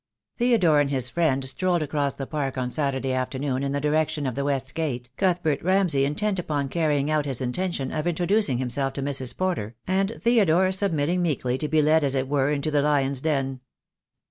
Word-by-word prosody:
Theodore 210 -11 +4
and 145 -1 +2
his 130 -3 0
friend 140 -6 +1
strolled 175 +3 0
across 145 -1 -1
the 135 - -5
Park 140 -2 -3
on 125 -1 -2
Saturday 135 -3 -1
afternoon 130 +1 -2
in 140 0 -1
the 140 - -1
direction 150 0 0
of 130 - -1
the 140 - -2
west 135 -2 -1
gate, 125 -7 -3
Cuthbert 175 -6 0
Ramsay 180 -7 +2
intent 190 +7 -1
upon 145 -5 -2
carrying 150 -2 0
out 155 -1 +1
his 135 -4 -1
intention 135 +2 -2
of 155 +2 -2
introducing 175 - +1
himself 130 +2 -2
to 140 - -4
Mrs. 135 -3 -1
Porter, 170 - -2
and 195 +2 +1
Theodore 190 -6 +3
sub 190 0 0
mitting 160 +4 0
meekly 135 -7 0
to 150 - -2
be 155 0 +2
led 155 +1 +4
as 140 -1 0
it 130 0 0
were 140 0 +1
into 150 +1 -1
the 145 -1 +2
lion's 140 -2 +1
den. 135 -4 -1
145 Hz, 195 wpm, -25 LUFS, 135-170 Hz, -, Theodore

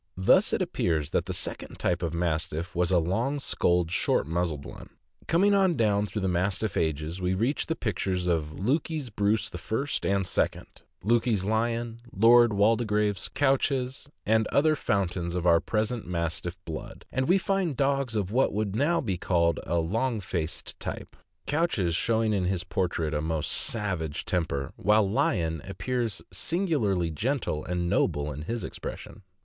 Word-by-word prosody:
Thus 95 - +4
it - - +1
appears 80 -3 -1
that - - 0
the - - -2
second - - -5
type 85 -1 0
of 85 -2 -1
Mastiff 85 0 -2
was 90 0 +1
a 95 - +4
long 115 - 0
skulled, 85 -9 +1
short 90 - +2
muzzled 80 -2 -2
one. - - -10 0.4
Coming 195 +5 +4
on 190 -4 +3
down 105 -3 +2
through 105 0 -4
the - - +1
Mastiff 95 +3 0
ages, 80 +3 -1
we 90 +1 +1
reach 120 +9 0
the 165 - -1
pictures 95 - -2
of 80 -4 0
Lukey's 140 - -1
Bruce 105 0 0
I. 110 - -2
and 100 -1 +1
II., 90 - 0 0.4
Lukey's 115 -2 +2
Lion, 115 +2 -1
Lord 120 +3 +6
Waldegrave's 105 -1 +1
Couchez, 135 -1 0 0.2
and 110 +1 +3
other 155 +2 +3
fountains 90 - -1
of 90 -1 -2
our 85 -1 +6
present 110 +2 -2
Mastiff 85 +1 -3
blood, 80 -2 -7
and 130 0 0
we 180 +3 +5
find 190 -6 0
dogs 135 -4 +1
of 100 -2 -1
what 130 +4 +3
wrould 105 -1 -1
now 150 +8 +2
be 95 -8 -2
called 85 -2 +2
a 85 - +1
long 110 +8 0
faced 85 -4 -4
type - - -6 0.2
— - - -50
Couchez 140 - +1
showing 110 +2 +1
in 95 -3 +1
his 90 -1 0
portrait 85 -4 -1
a 75 - 0
most 80 -1 -1
savage 90 -9 -2
temper, 75 -7 -1
while 105 0 +3
Lion 85 -6 0
appears 115 +1 -3
singu 170 -2 0
larly 90 -6 0
gentle 115 - -1
and 90 -1 -2
noble 75 -3 +1
in 75 +1 -6
his 115 +9 -3
expression. - - -7
100 Hz, 165 wpm, -27 LUFS, 85-120 Hz, 0.4 s, Lord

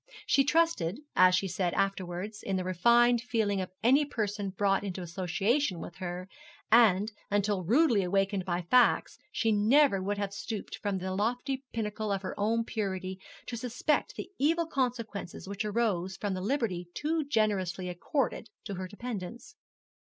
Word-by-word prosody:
She 275 - +4
trusted, 295 - +1 0.2
as 185 0 +6
she 195 - 0
said 180 -2 -1
afterwards, 195 +1 -2
in 195 - -2
the 185 - -1
refined 235 +6 +4
feeling 220 -5 0
of 185 - -4
any 265 +6 +5
person 210 -7 -2
brought 195 +1 +1
into 185 -2 -4
association 190 - 0
with 175 - -8
her, 180 0 -5 0.4
and, 215 -2 +5 0.2
until 205 -2 +1
rudely 235 - +4
awakened 195 +1 +1
by 175 -1 -2
facts, 245 +8 +3
she 225 - +1
never 215 +1 +4
would 200 +2 -2
have 200 -1 -3
stooped 205 0 -5
from 200 -2 -1
the 185 0 -3
lofty 245 +6 -1
pinnacle 215 -1 -3
of 195 0 -1
her 185 - -4
own 225 +3 +1
purity 190 -4 -3 0.3
to 240 - -5
suspect 250 - -1
the - - -7
evil 330 +4 +2
consequences 235 - -3
which 200 +1 -3
arose 205 -4 -1
from 205 -2 -2
the 185 - -3
liberty 200 -6 -1
too 315 +1 0
generously 200 -8 0
accorded 220 - -2
to 205 - -5
her 185 0 -5
dependents. 230 - -7
205 Hz, 160 wpm, -30 LUFS, 185-240 Hz, 0.4 s, as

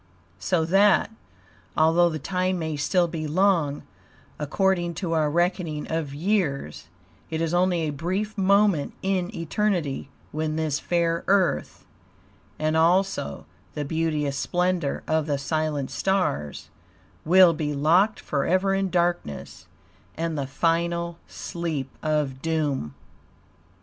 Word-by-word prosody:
So 170 -4 +1
that, 200 +5 +4 0.7
although 165 +2 +4
the 160 - -3
time 185 +3 -1
may 160 -2 -3
still 175 +4 +2
be 160 -2 -4
long, 165 -3 +2 0.6
according 175 +3 0
to 170 -1 -2
our 155 -2 +2
reckoning 170 -2 0
of 160 -3 -2
years, 150 - -1 0.4
it 160 - -2
is 165 0 -1
only 175 -1 +2
a 155 -2 -1
brief 185 +8 -3
moment 200 -5 +2
in 190 -2 0
eternity 165 -5 -1 0.2
when 155 0 -2
this 155 -2 -1
fair 170 -1 0
Earth, 190 -2 +1 0.7
and 155 +1 0
also 170 - +1 0.3
the 150 - -2
beauteous 150 -2 -1
splendor 180 -3 0
of 160 -1 +1
the 145 -2 0
silent 150 0 -2
stars, 180 - -1 0.5
will 180 +1 +6
be 150 -2 -2
locked 175 +9 +3
forever 185 +7 +1
in 195 0 0
darkness, 170 - -2 0.5
and 165 0 -2
the 140 -2 -2
final 170 +3 0
sleep 165 -6 -4
of 150 -4 -1
doom." 150 - -1
165 Hz, 120 wpm, -25 LUFS, 150-185 Hz, 0.7 s, will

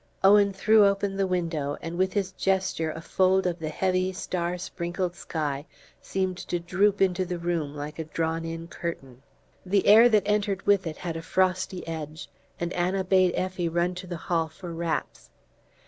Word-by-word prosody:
Owen 200 +1 +6
threw 215 +2 +4
open 200 0 0
the 195 -1 +1
window, 165 -6 -1
and 165 +1 -6
with 185 +1 +1
his 195 -2 -1
gesture 190 -4 0
a 165 +1 -6
fold 190 +2 +2
of 175 -1 -1
the 155 -1 -3
heavy 185 +2 0
star 180 -1 -3
sprinkled 175 0 -3
sky 145 -2 -3 0.3
seemed 185 -1 -2
to 175 - -3
droop 195 +4 +2
into 185 0 +1
the 180 -1 -4
room 170 -4 -2
like 150 +2 -6
a 160 - -3
drawn 165 +1 -2
in 165 0 -5
curtain. 135 -8 -6 0.4
The 195 +1 +1
air 225 +4 +8
that 215 -3 +4
entered 205 -2 0
with 200 -3 +3
it 155 - -5
had 170 -2 -4
a - - -5
frosty 185 +1 0
edge, 155 0 -6 0.3
and 170 0 -2
Anna 185 +2 0
bade 185 -1 +3
Effie 185 -2 -1
run 170 +2 0
to 180 +1 -8
the 175 -1 -4
hall 165 0 0
for 170 +2 -9
wraps. 165 -2 -3
180 Hz, 180 wpm, -26 LUFS, 165-190 Hz, 0.4 s, air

